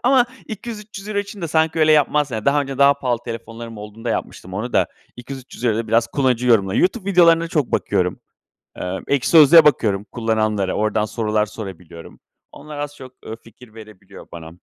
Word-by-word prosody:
ama 250 0 +4 0.2
€200-300 210 -2 -6
için 200 -1 -5
de 165 - -2
sanki 160 +1 +1
öyle 155 0 +5
yapmaz 150 -1 +2
Yani, 110 -2 -4
daha 145 +1 +3
önce 135 -1 -5
daha 140 0 +6
pahalı 125 -4 -2
telefonlarım 115 -1 -8
olduğunda 105 +2 -7
yapmıştım 95 +1 -5
onu 115 +5 -4
da - - +3 0.3
€200-300'ya 125 -2 -4
euro'ya 115 - -2
da - - -14
biraz 115 +1 +3
kullanıcı 125 -3 0
yorumları 100 -5 +3
YouTube 200 +1 0
videolarına 170 -2 +4
çok 150 -6 -1
bakıyorum. - - 0 0.6
Eee, 90 +1 -4
Ekşi 140 -3 +1
Sözlük'e 160 0 +8
bakıyorum, 105 -9 +2
kullananlara, 110 -4 -1
oradan 105 0 0
sorular 110 -1 -1
sorabiliyorum. 90 -6 -10 0.3
Onlar 150 0 -10
az 145 0 -5
çok, 130 -2 -12
eee, 110 - -6
fikir 115 0 -18
verebiliyor 110 -3 -13
bana. 80 -1 -9
125 Hz, 170 wpm, -20 LUFS, 110-155 Hz, 0.6 s, Sözlük'e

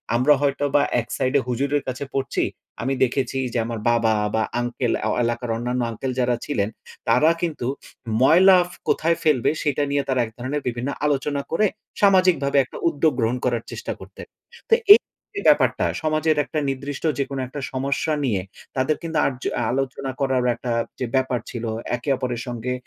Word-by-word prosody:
আমরা 130 +5 +5
হয়তো 145 0 0
বা 145 - +6 0.2
এক 115 - -4
সাইডে 130 +2 +2
হুজুরের 140 +4 0
কাছে 130 +2 -3
পড়ছি। 135 0 -1 0.4
আমি 130 +3 0
দেখেছি 135 +1 0 0.2
যে, - - 0
আমার 115 -1 -4
বাবা, 115 -1 +3 0.2
বা 110 - +2 0.2
আংকের 120 0 -1
আও - - +1
এলাকার 120 +1 -2
অন্যান্য 125 +2 -2
আঙ্কেল 130 +4 -4
যারা 125 -1 +2
ছিলেন। 105 -8 -1 0.4
তারা 155 - +5
কিন্তু 155 -8 -2 0.5
ময়লা 185 +7 +7
ফ - - -13 0.2
কোথায় 165 +1 +2
ফেলবে? 150 -7 +3
সেটা 145 -1 +1
নিয়ে 140 0 +1
তারা 130 -1 +1
এক 110 - -11
ধরনের 130 +4 -3
বিভিন্ন 120 +2 -2 0.2
আলোচনা 145 0 0
করে 215 +6 +3 0.4
সামাজিকভাবে 185 -8 +4
একটা - - -10
উদ্যোগ 155 0 +1
গ্রহণ 115 +2 +1
করার 120 -2 0
চেষ্টা - - -5
করতেন। - - -11 0.5
তো - - +9 0.2
এই - - +8 0.4
যে, 400 - -2
ব্যাপারটা, - - +3 0.2
সমাজের 155 0 +1
একটা 155 - -2
নির্দিষ্ট 140 +1 -5 0.2
যেকোনো 140 -1 -2
একটা 140 +3 -7
সমস্যা 140 +4 -1
নিয়ে 105 -7 0 0.4
তাদের 130 +4 +2
কিন্তু 165 -1 -3
আরজু 130 -2 -2
আ - - 0
আলোচনা 135 +1 -2
করারও 130 -2 +1
একটা 120 +1 -4 0.3
যে, 125 - -1
ব্যাপার 130 -2 +1
ছিল। 120 - -6 0.3
একে 125 +4 -5
অপরের 125 -2 -3
সঙ্গে 120 +1 -3
135 Hz, 175 wpm, -23 LUFS, 125-145 Hz, 0.5 s, তো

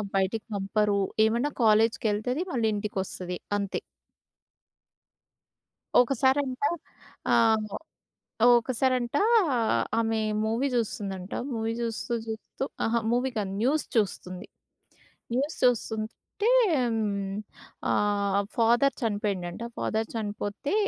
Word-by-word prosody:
బయటికి 195 +3 0
పంపరు. 200 +1 +1 0.3
ఏమన్నా 235 +6 +1
కాలేజ్‌కెళ్తది, 220 +4 +2
మళ్ళీ 235 -4 +1
ఇంటికి 205 -1 -4
వస్తది 180 -1 -5 0.2
అంతే. 200 -1 -2 2.2
ఒకసారంట 260 +1 +1 0.7
ఆహ్, 220 -2 +3 0.8
ఒకసారంట 255 +1 0 0.8
ఆమె 225 -1 +1 0.2
మూవీ 230 +5 +1
చూస్తుందంట, 200 -5 -3 0.2
మూవీ 225 -1 -1
చూస్తూ, 230 0 -3 0.2
చూస్తూ 220 +4 -5 0.2
అహా! 235 +1 +1
మూవీ 250 +2 +1
కాదు 200 -3 -1
న్యూస్ 290 +5 +2
చూస్తుంది. 185 -4 -1 0.9
న్యూస్ 280 +6 0
చూస్తుంటే 235 - 0 1.4
ఆహ్ 200 -1 +1
ఫాదర్ 240 +4 +4
చనిపోయిండంట. 205 -4 -2 0.2
ఫాదర్ 220 0 -1
చనిపోతే 210 - -3
225 Hz, 85 wpm, -27 LUFS, 205-245 Hz, 2.2 s, ఫాదర్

